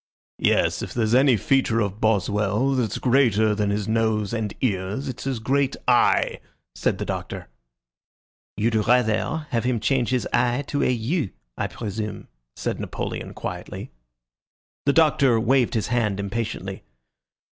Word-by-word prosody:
"Yes. -, -, +2 dB
If -, -, -6 dB
there's 115 Hz, -2 st, +1 dB
any 130 Hz, -1 st, +5 dB
feature 130 Hz, +1 st, +2 dB
of 100 Hz, -1 st, -2 dB
Boswell 105 Hz, +3 st, +1 dB
that's 125 Hz, -5 st, 0 dB
greater 115 Hz, -5 st, +3 dB
than 105 Hz, -1 st, 0 dB
his 100 Hz, 0 st, -1 dB
nose 110 Hz, -1 st, 0 dB
and 110 Hz, -3 st, -2 dB
ears, 100 Hz, +3 st, -1 dB
it's 130 Hz, -1 st, -6 dB
his 135 Hz, -2 st, -1 dB
great 135 Hz, +4 st, +1 dB
I," 125 Hz, -1 st, +3 dB, 0.3 s
said -, -, 0 dB
the -, -, -3 dB
Doctor. -, -, -5 dB, 1.1 s
"You'd 115 Hz, +3 st, +1 dB
rather 120 Hz, +7 st, +2 dB
have 115 Hz, -2 st, 0 dB
him 125 Hz, -2 st, 0 dB
change 125 Hz, +1 st, +1 dB
his 125 Hz, -1 st, 0 dB
I 125 Hz, +3 st, +2 dB
to 145 Hz, +1 st, -2 dB
a -, -, +2 dB
U, 125 Hz, -, 0 dB, 0.3 s
I -, -, -2 dB
presume," 105 Hz, -1 st, -5 dB, 0.3 s
said -, -, -3 dB
Napoleon, -, -, -5 dB
quietly. -, -, -6 dB, 1.0 s
The 140 Hz, -, +5 dB
Doctor 140 Hz, -7 st, +4 dB
waved 125 Hz, +1 st, +2 dB
his 110 Hz, -, -1 dB
hand 110 Hz, -5 st, 0 dB
impatiently. 105 Hz, +3 st, -4 dB
115 Hz, 145 wpm, -24 LUFS, 105-130 Hz, 1.1 s, any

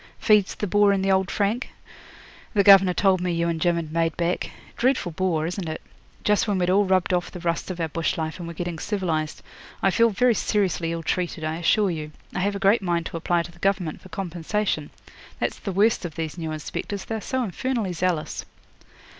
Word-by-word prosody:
"Feeds 210 Hz, -3 st, +3 dB
the -, -, -2 dB
boar 205 Hz, +1 st, +4 dB
in 195 Hz, -1 st, +1 dB
the 195 Hz, -, +2 dB
old 190 Hz, -1 st, +2 dB
frank?" 215 Hz, +5 st, 0 dB, 0.9 s
The 200 Hz, -, +5 dB
governor 195 Hz, -2 st, +7 dB
told 190 Hz, -2 st, +3 dB
me 180 Hz, 0 st, 0 dB
you 170 Hz, 0 st, 0 dB
and 165 Hz, -1 st, -2 dB
Jim 175 Hz, +1 st, +3 dB
had 160 Hz, -2 st, -4 dB
made 165 Hz, -1 st, 0 dB
back. 175 Hz, +1 st, -1 dB, 0.3 s
Dreadful 255 Hz, -8 st, +1 dB
bore, 165 Hz, -2 st, 0 dB
isn't 175 Hz, 0 st, -3 dB
it? 155 Hz, -, -4 dB, 0.4 s
Just 210 Hz, +1 st, +2 dB
when 205 Hz, -2 st, +1 dB
we'd 180 Hz, 0 st, +1 dB
all 200 Hz, +2 st, +4 dB
rubbed 185 Hz, -1 st, +2 dB
off 175 Hz, -1 st, 0 dB
the 180 Hz, -, -8 dB
rust 170 Hz, +1 st, -2 dB
of 180 Hz, -1 st, -5 dB
our 165 Hz, -, 0 dB
bush 165 Hz, +1 st, -1 dB
life 160 Hz, +2 st, -3 dB
and 170 Hz, -, -6 dB
were 170 Hz, -, -7 dB
getting 175 Hz, -1 st, -4 dB
civilised. 165 Hz, -7 st, -2 dB, 0.4 s
I 195 Hz, -, +4 dB
feel 230 Hz, +4 st, +4 dB
very 245 Hz, +3 st, +3 dB
seriously 190 Hz, -6 st, 0 dB
ill 165 Hz, 0 st, -4 dB
treated, 175 Hz, -2 st, -2 dB
I 155 Hz, +1 st, -2 dB
assure 195 Hz, +3 st, +2 dB
you. 155 Hz, -2 st, -5 dB, 0.2 s
I -, -, -2 dB
have 200 Hz, +2 st, 0 dB
a -, -, -1 dB
great 200 Hz, +3 st, +3 dB
mind 170 Hz, -3 st, 0 dB
to 170 Hz, -, -4 dB
apply 170 Hz, +1 st, +1 dB
to 170 Hz, -, -10 dB
the -, -, -20 dB
Government 185 Hz, -5 st, 0 dB
for 185 Hz, -, -14 dB
compensation. 180 Hz, -2 st, -2 dB, 0.5 s
That's -, -, -2 dB
the 200 Hz, -, -4 dB
worst 205 Hz, +4 st, +3 dB
of 165 Hz, -3 st, -5 dB
these 160 Hz, -2 st, -4 dB
new 165 Hz, -2 st, -4 dB
inspectors, 155 Hz, +6 st, -5 dB
they -, -, -4 dB
are 220 Hz, -, -3 dB
so 260 Hz, +3 st, -1 dB
infernally 225 Hz, -1 st, -2 dB
zealous.' 175 Hz, -2 st, -1 dB
180 Hz, 220 wpm, -24 LUFS, 165-200 Hz, 0.9 s, governor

